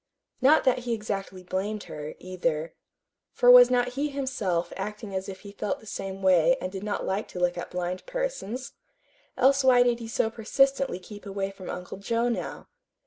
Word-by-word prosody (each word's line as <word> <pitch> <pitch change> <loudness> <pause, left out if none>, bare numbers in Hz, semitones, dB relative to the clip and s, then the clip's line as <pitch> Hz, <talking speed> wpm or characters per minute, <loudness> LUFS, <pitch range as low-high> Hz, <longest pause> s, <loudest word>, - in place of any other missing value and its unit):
Not 295 +4 +6
that 255 -2 +3
he 240 -1 -2
exactly 195 -3 -5
blamed 195 +3 -3
her, 150 0 -7
either. 170 -3 -2 0.6
For 245 - +6
was 250 0 +10
not 245 0 +2
he 280 +4 -2
himself 230 -12 -2
acting 210 +1 -5
as 190 +1 -3
if 190 -1 -8
he 200 - -10
felt 205 0 -3
the - - -17
same 195 -2 -6
way 185 +7 +5
and 185 -5 -4
did 190 -1 -6
not 210 -1 -2
like 195 +3 -2
to 180 - -7
look 180 0 +1
at 175 - -5
blind 180 0 -4
persons? - - -4 0.6
Else 275 +1 +4
why 250 -2 +6
did 240 -1 +1
he 230 - -6
so 225 0 0
persistently 270 +2 +1
keep 205 +3 -11
away 195 0 -3
from 195 -1 -10
Uncle 180 +1 -6
Joe 230 +4 0
now? 235 - -4
210 Hz, 190 wpm, -27 LUFS, 185-245 Hz, 0.6 s, was